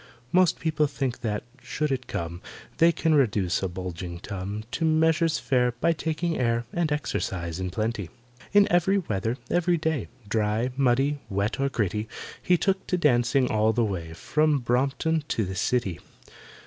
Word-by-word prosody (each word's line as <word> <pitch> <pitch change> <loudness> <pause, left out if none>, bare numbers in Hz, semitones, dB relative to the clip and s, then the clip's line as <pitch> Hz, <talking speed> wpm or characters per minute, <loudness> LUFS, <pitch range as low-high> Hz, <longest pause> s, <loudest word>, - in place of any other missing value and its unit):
Most 185 -2 +4
people 155 -2 +1
think 135 -3 -3
that, 105 -2 -2 0.2
should 150 -1 -2
it 130 -1 -2
come, 85 +1 -4 0.4
They 165 +1 +6
can 165 -1 +1
reduce 105 - +2
a 95 - 0
bulging 90 -1 -6
tum 100 +2 -5
To 165 - -2
measures 160 0 +3
fair 125 -2 +1
By 165 +8 +1
taking 165 +1 -2
air 115 -1 +1
And 170 -3 0
exercise 90 - -2
in 95 0 -2
plenty. 110 -1 -2 0.4
In 205 0 +6
every 175 +3 +3
weather, 115 - -1
every 175 0 +2
day, 160 -6 -1 0.2
Dry, 110 +3 0
muddy, 135 +2 +2
wet, 100 +4 -1
or 140 0 +1
gritty, 105 -3 -1 0.3
He 180 - +3
took 190 +2 0
to 180 - +1
dancing 125 -4 +3
all 110 +1 +3
the 120 -1 +2
way 85 -6 -4
From 150 - +1
Brompton 135 +6 0
to 110 - 0
the 95 - -4
City. 95 -4 0
125 Hz, 160 wpm, -26 LUFS, 105-160 Hz, 0.4 s, They